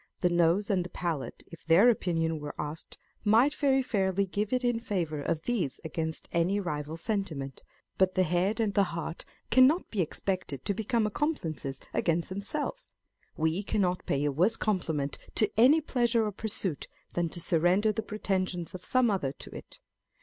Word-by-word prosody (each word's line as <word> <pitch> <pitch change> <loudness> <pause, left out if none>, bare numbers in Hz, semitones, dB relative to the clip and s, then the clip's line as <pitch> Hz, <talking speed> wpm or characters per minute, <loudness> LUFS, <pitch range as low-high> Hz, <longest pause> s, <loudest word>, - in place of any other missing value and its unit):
The 180 - +3
nose 175 +4 +3
and 185 -3 +2
the 175 - -8
palate, 165 -8 -4
if 165 -1 -13
their 170 +8 +6
opinion 165 -8 +1
were 145 0 -6
asked, 150 +2 -6 0.3
might 230 +7 +4
very 270 -3 +2
fairly 195 -5 +1
give 200 +2 -2
it 255 0 +1
in 240 -2 +1
favour 170 -9 -2
of 155 +2 -2
these 195 - -1
against 160 0 -3
any 180 +4 +1
rival 155 -4 -4
sentiment; 165 - -3 0.4
but 190 -1 +3
the 185 - +4
head 180 +6 +1
and 215 -3 +1
the 200 -1 +4
heart 165 0 -5 0.3
cannot 265 +8 +5
be 205 - 0
expected 170 -5 -3
to 200 - +1
become 220 +2 0
ac 210 - -2
complices 160 - -2
against 170 0 0
themselves. 290 - -4 0.5
We 160 +4 +1
cannot 185 -3 -1
pay 140 +1 +1
a 145 - +2
worse 180 +11 +3
compliment 160 -11 -1 0.2
to 215 -2 +3
any 265 +8 +6
pleasure 240 -5 +1
or 210 - -1
pursuit 200 -6 -2 0.3
than 175 -1 0
to 170 - -3
surrender 175 +6 +3
the 215 - -2
pretensions 185 -4 -2
of 185 -1 -8
some 255 -3 +3
other 165 -9 0
to - - -11
it. - - -9
185 Hz, 175 wpm, -29 LUFS, 165-220 Hz, 0.5 s, their